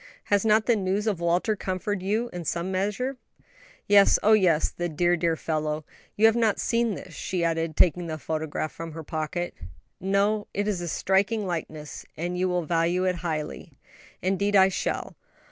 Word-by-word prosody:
Has 200 - +4
not 220 0 +4
the 240 - +4
news 195 +1 -1
of 205 -6 0
Walter 175 +5 +1
comforted 190 0 -3
you 220 +5 -1
in 175 -1 -5
some 170 +4 -2
measure?" 210 +8 -1 0.7
"Yes, 200 -1 +6
oh 220 - +6
yes; 180 -7 +3
the 175 0 -3
dear, 175 +3 +2
dear 165 -1 +1
fellow! 155 -1 -2 0.3
You 215 - +4
have 225 0 +6
not 225 -3 +2
seen 230 -3 +1
this," 180 -1 -10
she 180 0 -3
added, 165 -1 -1
taking 175 0 +3
the 160 -1 -4
photograph 155 0 -3
from 165 -1 -8
her 160 0 -7
pocket. 160 +3 -3 0.5
"No; 200 +2 +1
it 205 +1 0
is 195 -4 -1
a 175 - -4
striking 195 +5 +1
likeness, 155 -4 -5
and 175 +3 -3
you 185 +1 0
will 180 -1 0
value 170 +2 +1
it 185 -1 +1
highly." 155 -3 -4 0.5
"Indeed 200 +2 +1
I 190 -1 +7
shall. 190 - -3
180 Hz, 180 wpm, -26 LUFS, 165-205 Hz, 0.7 s, I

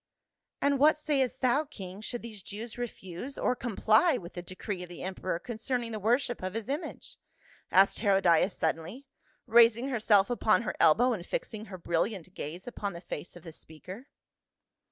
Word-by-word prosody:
"And 280 -1 +2
what 305 +2 +6
sayest 280 -4 0
thou, 260 +4 +3
king, 195 -8 -9
should 240 +2 -6
these 220 -4 -7
Jews 215 +4 -7
refuse 240 +1 -6
or 250 - +1
comply 240 - +3
with 175 -6 -9
the 175 - -5
decree 185 +2 -6
of 180 - -8
the 175 - -8
emperor 185 -2 -3
con 235 +5 -7
cerning 240 0 -2
the 215 - -4
worship 240 +3 +1
of 185 +2 -4
his 225 -1 -4
image?" 290 +5 -5 0.5
asked 195 +1 +5
Herodias 195 -3 +3
suddenly, 165 - -2 0.4
raising 235 +2 +5
herself 215 -4 +3
upon 230 -1 +3
her - - -2
elbow 225 +11 +5
and 190 -6 -4
fixing 215 +4 -4
her 190 -3 -8
brilliant 175 +2 -2
gaze 170 +4 -6
upon 205 -5 -4
the 170 - -7
face 175 -1 -7
of 175 - -12
the 165 -3 -9
speaker. 185 - -11
215 Hz, 175 wpm, -30 LUFS, 185-245 Hz, 0.5 s, what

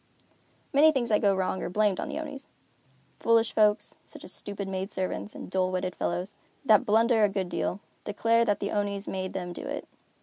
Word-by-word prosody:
Many 300 +3 +7
things 255 -5 -1
that 210 - +3
go 200 -2 +4
wrong 190 0 -1
are - - -3
blamed 205 0 +2
on - - -3
the - - -4
Onis. 290 -3 -6 0.7
Foolish 230 0 +3
folks, 210 -1 +2
such - - -12
as - - -8
stupid 200 -1 -5
maid 190 +1 -3
servants, 190 +3 -3
and - - -7
dull 185 0 +1
witted 185 0 -2
fellows, 180 +3 -2 0.3
that 215 -5 +5
blunder 225 +1 +4
a 205 - +5
good 195 -2 -2
deal, 190 +3 -2 0.2
declare 230 +3 +2
that 205 -3 +1
the 200 - -2
Onis 205 -1 -2
made 185 -1 -3
them 180 -2 -4
do - - -7
it. - - -5
205 Hz, 200 wpm, -28 LUFS, 190-225 Hz, 0.7 s, Many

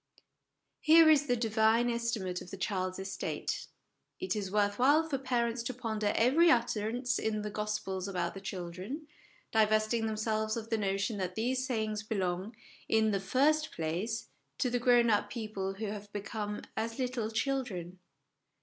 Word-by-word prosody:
Here 320 0 +7
is 295 -1 +4
the 245 - +3
Divine 225 0 +3
estimate 230 -6 -1
of - - -10
the 195 - -7
child's 185 -1 -2
estate. 190 0 -4 0.5
It 370 -9 -1
is 200 -3 -3
worth 205 0 +1
while 295 +5 +5
for 275 -4 -1
parents 240 -2 0
to 235 +1 -4
ponder 220 -4 -1
every 285 +9 +5
utterance 240 0 +1
in 215 -1 -1
the 210 - -4
Gospels 210 -3 -3
about 180 -3 -2
the 195 - -8
children, 190 - -6 0.5
divesting 215 +1 +2
themselves 215 0 -1
of 225 0 -6
the 225 - +2
notion 200 +2 -1
that 185 -2 -3
these 255 +3 0
sayings 215 -3 -1
belong, 195 0 -2 0.3
in 220 -1 +3
the 200 - +1
first 300 +10 +2
place, 180 +9 -3 0.3
to 250 - 0
the 245 - +1
grown 240 -1 +5
up 205 0 +2
people 205 -4 -4
who 220 +3 -4
have 205 0 -6
become 210 0 -4
as 225 +1 -2
little 250 -4 -1
children. 220 -8 -2
220 Hz, 160 wpm, -31 LUFS, 200-245 Hz, 0.5 s, Here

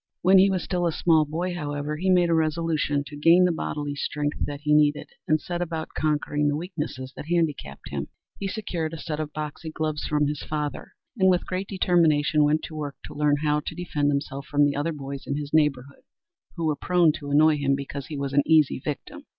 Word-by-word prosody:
When 190 +2 +7
he 195 +1 +6
was 185 -2 -1
still 175 -2 0
a - - +1
small 160 -1 +3
boy, 170 +5 -3
however, 150 -2 -3
he 190 +4 -1
made 175 -2 +4
a - - +4
resolution 155 -2 0
to 145 - -9
gain 165 +5 +5
the 180 - +3
bodily 145 -3 -3
strength 145 +1 -3
that 145 0 -6
he 150 0 +1
needed 150 -1 +3 0.2
and 155 0 +3
set 175 +3 -4
about 160 -2 -3
conquering 150 -1 0
the 145 - +1
weaknesses 150 -6 -5
that - - -8
handicapped 160 - -2
him. - - -3 0.3
He 195 - -2
secured 180 -6 -3
a - - -7
set 150 0 -4
of 155 -1 -3
boxing 155 +1 -6
gloves 155 -1 -2
from 150 -1 +2
his 145 0 -2
father, 150 -1 -4 0.3
and 190 0 +5
with 180 -1 +2
great 185 +1 -3
determination 160 -5 +3
went 150 +1 +2
to 155 - -7
work 145 -2 -4
to - - -9
learn 150 0 +2
how 150 0 +2
to 150 - -6
defend 150 -4 -1
himself 140 -1 -3
from 145 0 +3
the 145 - 0
other 145 +4 -1
boys 140 -2 -7
in 140 - -1
his 145 0 -6
neighborhood, 140 -3 +1 0.5
who 165 -2 -2
were 155 -1 +1
prone 175 0 +3
to 145 -2 -7
annoy 150 +2 +5
him 140 -1 +1
because 140 0 -6
he 155 - -6
was 140 -1 -3
an 145 - +5
easy 155 -5 +3
victim. 280 - -6
150 Hz, 220 wpm, -25 LUFS, 145-170 Hz, 0.5 s, When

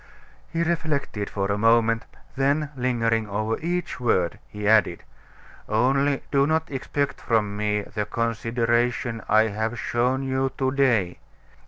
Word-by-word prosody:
He 165 0 -1
reflected 155 -11 -2
for 100 0 -2
a 100 - -1
moment, 115 +1 +3 0.3
then 140 +2 +1
lingering 115 -4 0
over 110 +2 -1
each 175 -1 -3
word, 95 -8 +1
he 105 0 -5
added: 105 -5 +3 0.7
"Only 135 +5 +2
do 140 0 +3
not 160 +1 +1
then 135 - -4
expect 140 +2 -2
from 105 -3 0
me 105 0 0
the 105 0 -4
consideration 115 +1 0
I 110 +1 +4
have 110 +3 -2
shown 125 +4 0
you 130 0 -1
to 130 -1 +1
day. 120 -10 +1
115 Hz, 140 wpm, -24 LUFS, 110-135 Hz, 0.7 s, I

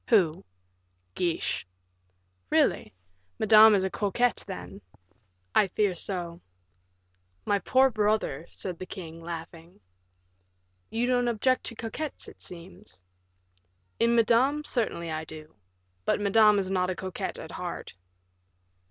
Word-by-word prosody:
"Who?" 175 -8 +3 0.7
"Guiche." 170 - -1 0.8
"Really? - - +2 0.5
Madame 220 0 +7
is 190 - +2
a 190 - -1
coquette, 230 +4 0
then?" 195 +1 -8 0.7
"I 205 - +4
fear 200 +1 +1
so." 175 -1 -3 1.0
"My 205 - +2
poor 260 +5 +3
brother," 210 - 0
said 180 -3 -6
the 185 - -7
king, 165 -4 -8
laughing. 165 -1 -8 1.1
"You 230 +2 0
don't 245 -1 +2
object 255 +3 +1
to 230 - -4
coquettes, 240 +7 -5
it - - -14
seems?" 180 - -11 1.0
"In 235 +1 +3
Madame, 245 +6 +3
certainly 215 - -1
I 155 0 -3
do; 155 0 -11 0.5
but - - +1
Madame 210 +1 +5
is 190 -1 -1
not 185 -1 +1
a 185 - -2
coquette 185 -1 -4
at - - -8
heart." - - -6
200 Hz, 120 wpm, -28 LUFS, 175-225 Hz, 1.1 s, Madame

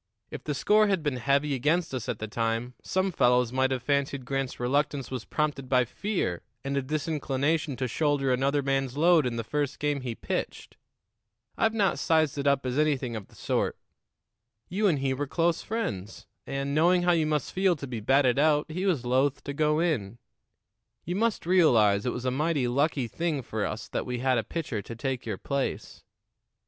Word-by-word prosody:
If - - -7
the 150 - -2
score 210 +10 +4
had 190 -5 0
been 145 -4 -1
heavy 140 +4 +1
against 150 +5 +1
us 125 -4 -4
at - - -2
the 110 - -5
time, 115 +3 -2
some 190 +1 0
fellows 125 -5 +3
might 130 0 +2
have 130 -2 -2
fancied 140 -1 0
Grant's 135 0 -3
reluctance 140 +2 0
was 125 -4 -4
prompted 145 -4 -2
by 125 -1 +4
fear 180 - -2 0.2
and 140 0 -1
a 140 - +1
disinclination 150 0 -1
to 130 +1 -2
shoulder 140 0 +1
another 140 +3 +1
man's 135 -1 -1
load 165 -3 +5
in 120 - -3
the 115 - -2
first 145 +2 -2
game 145 -2 -1
he 120 -3 -4
pitched. - - -4 0.8
I've 225 0 +1
not 200 -4 +2
sized 155 -3 +2
it 140 - -1
up 140 -1 +2
as 130 +3 -1
anything 140 -6 +1
of 105 -3 -6
the - - -21
sort. - - -1 0.9
You 205 +4 +1
and 165 -6 +2
he 135 -1 0
were 145 +2 -3
close 165 +3 +1
friends, 175 - -4 0.2
and, 140 +1 -2
knowing 175 +4 +4
how 175 - +4
you 160 -3 +2
must 150 -3 -1
feel 190 -1 +3
to 140 - -7
be 125 -4 -5
batted 130 +3 +3
out, 150 +1 +2
he 185 +5 -2
was 150 -10 0
loath 130 +3 +1
to 140 - -4
go 150 +1 +2
in. 120 - -1 0.9
You 175 - -2
must 225 -1 0
realize 120 - +4
it - - +1
was 125 +1 -5
a 130 - +1
mighty 145 -1 0
lucky 140 0 +1
thing 155 0 -2
for 110 -2 -2
us 110 - -6
that - - -3
we 125 0 -2
had 130 0 +2
a - - -2
pitcher 140 -9 -4
to 115 - -8
take 125 0 -3
your 105 -4 -2
place. 140 +5 -3
140 Hz, 200 wpm, -27 LUFS, 125-155 Hz, 0.9 s, load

